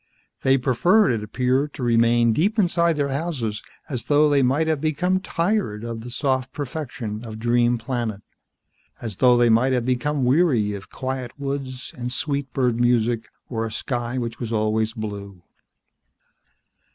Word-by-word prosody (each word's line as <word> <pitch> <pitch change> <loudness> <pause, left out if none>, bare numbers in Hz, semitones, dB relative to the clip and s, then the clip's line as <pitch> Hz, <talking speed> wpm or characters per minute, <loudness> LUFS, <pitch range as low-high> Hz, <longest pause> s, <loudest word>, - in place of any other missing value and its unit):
They 135 0 +4
preferred, 175 - +3
it 110 -3 -1
appeared, 130 +6 0
to 130 - -5
remain 115 0 +4
deep 200 - +1
inside 170 -4 +2
their 140 -1 0
houses, 135 -8 -2 0.3
as 130 -5 -5
though 150 +1 +4
they 140 -1 +4
might 135 +5 +2
have 160 -3 0
become 180 +5 +1
tired 180 - -1
of 115 -1 -5
the 120 - -8
soft 130 0 -1
perfection 125 -7 -5
of 110 -2 -7
Dream 120 +1 +2
Planet. 115 -4 -3 0.8
As 110 -5 -6
though 125 -2 +5
they 120 -1 +4
might 120 +4 +4
have 125 -2 0
become 130 +2 0
weary 125 -7 +3
of 100 -1 -8
quiet 130 -2 -4
woods 135 -2 -4
and 125 -1 -4
sweet 140 0 -2
bird 125 -3 +1
music 120 -1 +2 0.2
or 115 -3 -2
a 115 - -4
sky 120 +2 -3
which 120 -1 -4
was 115 -2 -4
always 110 0 0
blue. 100 -5 -7
125 Hz, 160 wpm, -23 LUFS, 115-140 Hz, 0.8 s, though